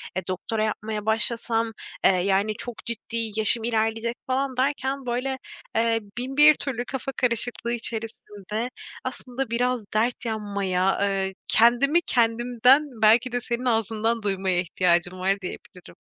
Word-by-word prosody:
e, 185 -1 -3
doktora 215 +4 -2
yapmaya 215 -1 -4
başlasam, 225 +1 +1 0.3
eee, - - +7
yani 195 +3 +1
çok 240 -2 -7
ciddi 230 -1 -3
yaşım 220 +1 +3
ilerleyecek 225 +1 0
falan 260 0 -1
derken, 270 0 -1
böyle, 255 +2 -2 0.4
eee, 225 0 +2 0.2
bin 265 +3 -4
bir 300 0 +8
türlü 245 -3 -4
kafa 270 0 -4
karışıklığı 235 -1 0
içerisinde, 225 -1 -4 0.3
aslında 255 -1 -5
biraz 245 -1 0
dert 235 +3 0
yanmaya, 200 -4 -1
eee, 195 -1 0
kendimi 260 +9 +4
kendimden, 245 +3 +3
belki 230 +3 +5
de 245 0 -1
senin 240 +1 -3
ağzından 225 -1 0
duymaya 190 -2 0
ihtiyacım 180 0 +1
var 190 +1 0
diyebilirim. 180 0 -9
230 Hz, 130 wpm, -25 LUFS, 210-245 Hz, 0.4 s, bir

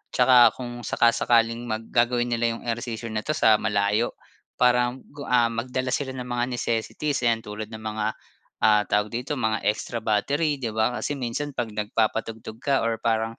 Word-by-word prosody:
'tsaka 125 -2 +6
kung 120 -1 -7
saka-sakaling 115 -1 +2
mag 110 0 -3
gagawin 120 0 +2
nila 115 0 +1
yung - - -11
ehersisyo 115 -1 -4
na 110 - -1
ito 155 +8 -2
sa 110 -5 +5
malayo. 105 +2 0 0.4
Parang 125 +1 +2
ku 145 0 -9
ah, 120 -2 +3
magdala 130 +2 -2
sila 130 0 -2
ng 125 - -4
mga 120 0 -1
necessities 120 +5 -1
'yan, 115 -2 +1
tulad 105 +1 -6
ng 110 0 -9
mga, 110 0 -2 0.6
ah, 105 -1 +5
tawag 105 +1 +1
dito 125 +5 -3
mga 110 -4 0
extra 110 +2 -1
battery 140 +9 +1
'di 125 -5 -4
ba? 110 +3 0
Kasi 145 -1 -2
minsan 130 +4 -3
pag 120 -4 -3
nagpapatugtog 110 +1 -2
ka 140 -2 +2
or 115 0 0
parang 115 0 0
115 Hz, 175 wpm, -25 LUFS, 110-125 Hz, 0.6 s, tsaka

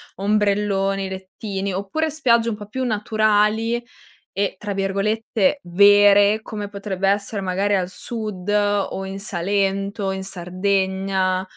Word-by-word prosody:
ombrelloni, 200 -1 +1
lettini, 190 +1 -5
oppure 200 +13 -2
spiagge 235 -6 +2
un 220 - -2
po' 210 0 -9
più 260 +5 -4
naturali, 215 0 +1 0.5
e 195 0 -1
tra 205 -1 -4
virgolette 210 +5 0
"vere", 205 +3 +5
come 210 -2 -6
potrebbe 195 -1 -2
essere 200 0 -1
magari 195 +2 0
al 180 -2 -1
Sud 210 -2 -6
o 205 -2 +1
in 195 0 -6
Salento, 195 +1 -1
in 190 0 -4
Sardegna? 190 0 -1
200 Hz, 120 wpm, -21 LUFS, 195-210 Hz, 0.5 s, vere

